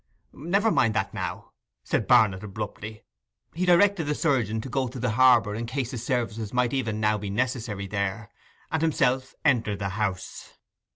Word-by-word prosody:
'Never 200 +9 +1
mind 115 - +2
that - - -1
now,' - - -5 0.3
said - - -1
Barnet 100 -3 +4
abruptly. 105 +1 -7 0.5
He 180 +3 -2
directed 180 -1 +4
the 150 +1 -1
surgeon 120 -9 0
to 130 - -7
go 130 0 -1
to 125 +2 -8
the 125 -1 0
harbour 120 -3 +4
in 115 +2 -4
case 130 0 -3
his 120 -4 -5
services 115 -4 -2
might 125 0 +1
even 115 -5 -1
now 105 0 +1
be 100 0 -5
necessary 115 -2 -2
there: 100 +2 -3 0.4
and 160 - 0
himself 130 -5 +1
entered 115 -7 +2
the 100 0 -3
house. 95 -2 -4
115 Hz, 170 wpm, -26 LUFS, 105-135 Hz, 0.5 s, Barnet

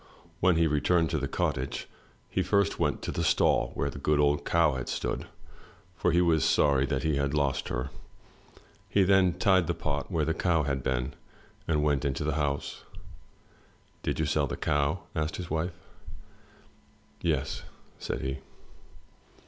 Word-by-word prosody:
When 90 -1 +4
he 85 0 +3
returned 80 +2 +2
to 80 - 0
the 70 - -2
cottage 65 0 -2 0.4
he - - -1
first 100 -1 +1
went - - 0
to - - -2
the - - -2
stall - - +3
where 70 - -1
the 70 - -8
good 75 +1 +2
old 75 0 +2
cow 85 -3 +3
had 65 -2 -4
stood, - - -3 0.7
for 90 - +1
he 85 +1 +4
was 80 -4 +3
sorry 70 -2 +3
that 70 -3 -1
he 80 -3 +1
had 70 +1 0
lost 70 -2 0
her. 65 +2 -3 1.0
He 100 - +4
then 95 -2 +4
tied 95 -2 +3
the 85 - 0
pot 75 -3 -3
where 80 -4 +1
the 80 - +1
cow 80 -2 +1
had 70 -2 -1
been, 65 +2 -1 0.5
and 75 -2 +1
went 75 -2 +1
on 70 - +1
into 70 - -3
the 75 0 0
house. 70 -2 -2 1.2
*'Did - - -2
you 80 - +2
sell 75 -1 +1
the - - -4
cow?" 75 +3 0
asked 75 0 -1
his 90 -3 -6
wife. 80 +2 -1 1.5
"Yes," - - -1 0.4
said - - -3
he. 65 0 -3
75 Hz, 170 wpm, -28 LUFS, 70-85 Hz, 1.5 s, When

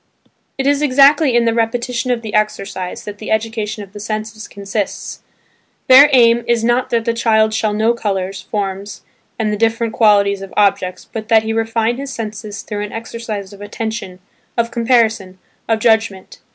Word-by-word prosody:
It 270 - -2
is 285 +1 +2
exactly 280 0 +4
in 240 -1 +3
the 230 - +2
repetition 235 +2 -1
of 240 -2 -1
the 215 - -6
exercise 195 -3 -2
that 205 0 -8
the 215 - -7
education 220 -1 -2
of 195 -1 -15
the 205 - -8
senses 215 0 -5
consists; 200 0 -5 0.6
their 270 +3 +8
aim 235 -2 +5
is 235 -1 +1
not 240 +2 +1
that 230 -1 0
the 230 - +1
child 220 -2 +2
shall 220 -1 0
know 220 +3 +2
colours, 195 -4 -3
forms 195 0 -5 0.3
and 215 -2 -1
the - - -2
different 225 +1 0
qualities 200 -3 +3
of 195 - -10
objects, 185 -3 +1
but 220 -1 -7
that 225 -1 +4
he 220 0 -2
refine 225 +1 0
his 275 0 -6
senses 215 -3 -6
through 205 -1 -5
an 210 - -6
exercise 225 -3 -6
of 200 - -13
attention, 220 -2 -5 0.4
of 235 0 0
comparison, 225 -5 +1 0.3
of 225 - +3
judgment. 220 -4 0
220 Hz, 175 wpm, -17 LUFS, 205-235 Hz, 0.6 s, their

